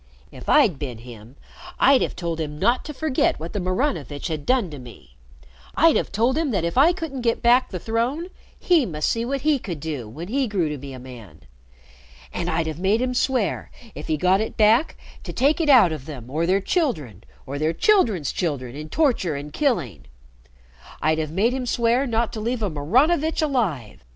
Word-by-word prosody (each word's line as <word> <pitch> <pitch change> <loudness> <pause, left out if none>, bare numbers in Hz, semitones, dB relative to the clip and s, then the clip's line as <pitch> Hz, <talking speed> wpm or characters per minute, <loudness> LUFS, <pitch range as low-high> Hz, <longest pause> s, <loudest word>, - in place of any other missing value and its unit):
"If - - -9
I'd 165 -8 +4
bin 130 -6 -5
him 115 +1 -13 0.4
I'd 270 0 +5
have - - -2
told 170 -2 -4
him 150 -1 -5
not 240 +10 +1
to - - -5
forget 305 -2 0
what 165 +2 -7
the 205 - -2
Maranovitch 185 - -2
had 155 -3 -5
done 245 -9 +2
to 145 - -8
me. 115 - -14 0.6
I'd 330 +1 +5
have - - -1
told 235 +8 +1
him 320 -3 0
that 195 -8 -1
if 170 - -2
I 285 +7 +6
couldn't 320 -7 -5
get 230 -1 0
back 245 +2 +4
the 185 - -5
throne, 235 - -2 0.3
he 345 -5 +3
must 155 -3 -1
see 230 - -1
what 275 +2 -2
he 300 -1 +2
could 175 -9 -6
do 140 -7 -5
when 160 +10 -8
he 265 +4 0
grew 185 -7 0
to 150 -2 -5
be 140 +1 -8
a - - -8
man. 125 -5 -12 0.9
And - - -3
I'd 170 - 0
have 160 0 -5
made 195 +4 +2
him 250 0 -1
swear, 250 -4 0 0.2
if 150 - -8
he 155 - 0
got 185 +5 +3
it 220 - -5
back, 220 +8 +3 0.3
to - - -6
take 290 +7 +2
it 310 - 0
out 240 - +7
of 150 -2 -6
them 130 -5 -9
or 160 +3 0
their 195 +2 +2
children 155 - -2 0.2
or 140 +2 -5
their 155 +1 +1
children's 215 - +2
children 135 -7 -3
in 155 +1 -7
torture 245 - +1
and 145 +1 -7
killing. 215 - -1 0.9
I'd 155 0 +1
have 155 -1 -2
made 210 +8 +1
him 260 -1 -3
swear 240 +3 +1
not 230 -1 0
to 220 - -5
leave 230 +1 -2
a 200 - -1
Maranovitch 280 - +1
alive. 170 - -2
195 Hz, 205 wpm, -23 LUFS, -, 0.9 s, out